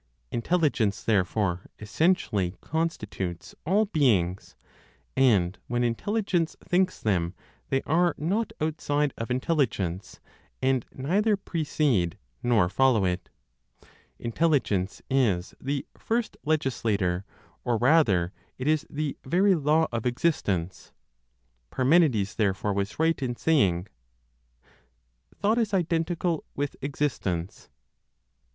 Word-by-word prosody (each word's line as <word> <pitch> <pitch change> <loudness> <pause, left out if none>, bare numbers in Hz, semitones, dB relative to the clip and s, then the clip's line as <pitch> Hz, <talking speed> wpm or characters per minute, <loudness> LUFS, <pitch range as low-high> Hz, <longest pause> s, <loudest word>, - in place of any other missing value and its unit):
Intelligence, 120 - +1
therefore, 95 -3 0
essentially 105 - +1
constitutes 105 - -3
all 205 +5 +3
beings; 105 - +1 0.6
and 105 -9 +3
when 120 +1 0
Intelligence 175 - 0
thinks 185 +1 +1
them, 90 -4 0 0.3
they 135 - +1
are 170 +3 +2
not 200 +9 -1
outside 150 -2 0
of 115 - -5
Intelligence, 125 - -1 0.4
and 130 -2 +1
neither 200 +10 +1
precede 145 - 0 0.2
nor 115 -7 +3
follow 120 0 +3
it. 90 -1 -2 0.9
Intelligence 115 - 0
is 105 -9 +1
the 140 +1 -2
first 230 0 -2
legislator, 110 - 0 0.4
or 120 -2 +1
rather, 110 - +3 0.2
it 130 - -4
is 155 +1 +2
the 150 0 -3
very 190 +8 +3
law 155 0 +3
of 115 0 -1
existence. 105 - -1 0.8
Parmenides 130 - +3
therefore 100 -1 +1
was 100 +1 -2
right 160 -1 +1
in 125 -2 -1
saying, 100 - +2 1.5
"Thought 220 +3 +1
is 210 -4 +1
identical 170 -1 0
with 145 0 -2
existence." 125 - -3
130 Hz, 100 wpm, -27 LUFS, 100-160 Hz, 1.5 s, all